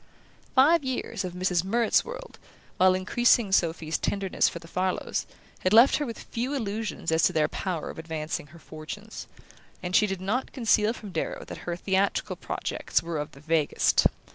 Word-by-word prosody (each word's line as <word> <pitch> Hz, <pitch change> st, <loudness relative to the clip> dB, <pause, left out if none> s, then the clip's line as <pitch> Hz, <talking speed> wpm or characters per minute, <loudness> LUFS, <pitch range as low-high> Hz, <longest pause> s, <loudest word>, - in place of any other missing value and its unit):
Five 295 Hz, +4 st, +5 dB
years 260 Hz, -6 st, -3 dB
of 180 Hz, -1 st, -5 dB
Mrs. 180 Hz, -1 st, 0 dB
Murrett's 230 Hz, +4 st, +2 dB
world, -, -, -9 dB, 0.4 s
while 185 Hz, 0 st, +5 dB
increasing 215 Hz, +3 st, +3 dB
Sophy's 165 Hz, -3 st, +1 dB
tenderness 195 Hz, -2 st, +1 dB
for -, -, -7 dB
the 165 Hz, -1 st, -11 dB
Farlows, 185 Hz, +2 st, -2 dB, 0.3 s
had 185 Hz, -, +1 dB
left 235 Hz, +5 st, +7 dB
her 295 Hz, -, -2 dB
with 230 Hz, -, -7 dB
few 250 Hz, +5 st, -3 dB
illusions 215 Hz, -7 st, -3 dB
as 160 Hz, 0 st, +3 dB
to 180 Hz, -, +2 dB
their 155 Hz, -2 st, +3 dB
power 180 Hz, -5 st, -4 dB
of -, -, -11 dB
advancing 160 Hz, -2 st, -4 dB
her 160 Hz, +3 st, -15 dB
fortunes; 165 Hz, +8 st, -9 dB, 0.6 s
and 180 Hz, 0 st, -2 dB
she 210 Hz, -, +5 dB
did 195 Hz, -2 st, -3 dB
not 210 Hz, +8 st, -2 dB
conceal 225 Hz, -3 st, +2 dB
from 210 Hz, -4 st, -9 dB
Darrow -, -, -3 dB
that -, -, -8 dB
her 170 Hz, -, -1 dB
theatrical 195 Hz, +2 st, 0 dB
projects -, -, -2 dB
were 165 Hz, -2 st, -3 dB
of 150 Hz, -, -5 dB
the 140 Hz, -, -14 dB
vaguest. 155 Hz, -1 st, +3 dB
190 Hz, 175 wpm, -27 LUFS, 165-225 Hz, 0.6 s, left